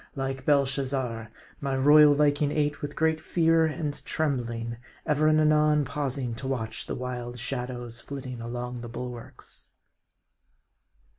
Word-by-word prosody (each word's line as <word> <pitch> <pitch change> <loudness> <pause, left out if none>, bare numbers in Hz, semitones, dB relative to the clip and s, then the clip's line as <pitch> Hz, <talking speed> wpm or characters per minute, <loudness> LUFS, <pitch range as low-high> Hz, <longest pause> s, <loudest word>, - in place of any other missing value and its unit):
Like 135 -1 -3
Belshazzar, 135 -5 +1 0.3
my 135 -2 -1
royal 145 +2 +7
Viking 145 0 +2
ate 150 -1 0
with 145 0 -5
great 160 0 +2
fear 165 0 +3
and 150 -1 -3
trembling; 120 -6 -2 0.3
ever 155 0 +2
and 155 0 +5
anon 150 -1 +4
pausing 135 -3 -2
to 130 - -4
watch 115 -5 -3
the - - -3
wild 125 -1 -5
shadows 120 -1 -3
flitting 130 -4 -7
along 120 +1 -5
the 120 - -7
bulwarks. 120 0 -6
135 Hz, 130 wpm, -27 LUFS, 125-150 Hz, 0.3 s, royal